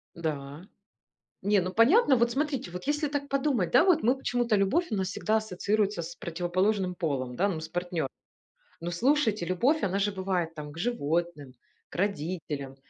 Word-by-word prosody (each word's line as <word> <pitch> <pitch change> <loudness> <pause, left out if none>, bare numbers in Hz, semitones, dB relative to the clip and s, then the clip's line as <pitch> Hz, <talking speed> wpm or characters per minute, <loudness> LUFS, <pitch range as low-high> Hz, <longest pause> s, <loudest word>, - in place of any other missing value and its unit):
Да. 150 -1 -5 0.8
Не, 205 +1 +3
ну 185 +1 -3
понятно. 275 - +5
Вот 235 0 +2
смотрите, 275 - -2
вот 180 +1 -7
если 295 +1 +1
так 285 0 -3
подумать, 270 - +1
да, 250 - +6
вот 350 -4 +4
мы 250 +4 +3
почему-то, 240 -4 0
любовь 250 - +1
у - - +1
нас 190 -2 -1
всегда 215 +2 0
ассоциируется 210 -1 0
с 170 +1 -7
противоположным 180 +3 -1
полом, 135 -7 -2
да, 200 +9 +2
ну 170 -5 -3
с 160 - -6
партнёр 175 -3 -2 0.7
Но 170 +1 -4
слушайте, 225 - +2
любовь, 245 - +1
она 195 0 0
же 205 +1 +1
бывает 185 -4 -2
там, 150 -1 -7
к 155 - -13
животным, 170 - -2 0.4
к - - -13
родителям, 155 -7 -3
190 Hz, 170 wpm, -28 LUFS, 170-240 Hz, 0.8 s, да